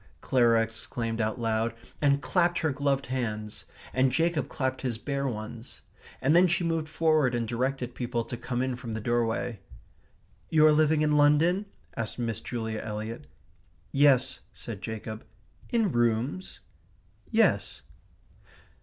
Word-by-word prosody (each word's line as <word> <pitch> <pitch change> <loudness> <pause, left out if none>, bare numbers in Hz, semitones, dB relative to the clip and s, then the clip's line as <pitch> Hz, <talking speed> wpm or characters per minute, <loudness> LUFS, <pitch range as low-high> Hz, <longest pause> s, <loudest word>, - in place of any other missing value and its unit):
Clara 115 -3 +3
exclaimed 115 0 -4
out 110 +2 -1
loud, 115 0 0 0.3
and 140 -1 +3
clapped 175 -1 +2
her 160 -2 +1
gloved 140 0 0
hands; 110 -5 -4 0.3
and 130 0 +3
Jacob 165 +2 +1
clapped 130 -2 -2
his 125 -4 -2
bare 140 +3 -2
ones; 115 0 -6 0.4
and 145 +5 +3
then 180 +1 +7
she 175 +1 +1
moved 165 -2 -1
forward 155 -6 +2
and 115 -1 -1
directed 125 +1 -2
people 120 -1 -2
to 120 - -6
come 120 +1 -2
in 130 -1 -1
from 120 -2 -6
the 110 - -2
doorway. 115 -1 -1 0.9
"You 155 -1 +5
are 155 - +7
living 155 0 +3
in 150 -1 +3
London?" 160 +7 +4 0.3
asked 115 -1 -3
Miss 115 -3 -2
Julia 110 -2 -3
Eliot. 110 +2 -5 0.6
"Yes," 135 -3 +4 0.2
said 105 -5 -7
Jacob. 110 +1 -6 0.5
"In 225 -5 +2
rooms?" 120 +9 0 0.7
"Yes." - - +2
125 Hz, 140 wpm, -28 LUFS, 115-150 Hz, 0.9 s, then